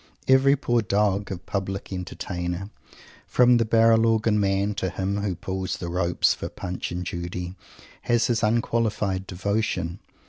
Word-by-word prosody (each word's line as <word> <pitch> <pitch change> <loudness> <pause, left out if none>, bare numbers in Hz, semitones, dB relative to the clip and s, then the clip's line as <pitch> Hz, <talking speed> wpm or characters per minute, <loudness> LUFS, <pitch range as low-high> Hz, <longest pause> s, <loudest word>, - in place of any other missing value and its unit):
Every 130 +1 +5
poor 120 -4 +1
dog 100 -1 0
of 90 -1 -6
Public 95 0 -4
Entertainer, 90 +1 -4 0.6
from 125 -1 +5
the 115 - +2
Barrel 115 0 +4
Organ 110 -1 +2
man 100 +1 +1
to 95 - -1
him 95 +2 -2
who 100 -3 -1
pulls 95 +2 -3
the 85 - -5
ropes 85 -1 +2
for - - -6
Punch 90 0 -5
and 90 +1 -4
Judy, 90 +1 -4 0.6
has 120 -1 +4
his 115 -2 +1
unqualified 105 -4 0
devotion. 95 -2 -2
100 Hz, 145 wpm, -25 LUFS, 90-115 Hz, 0.6 s, Every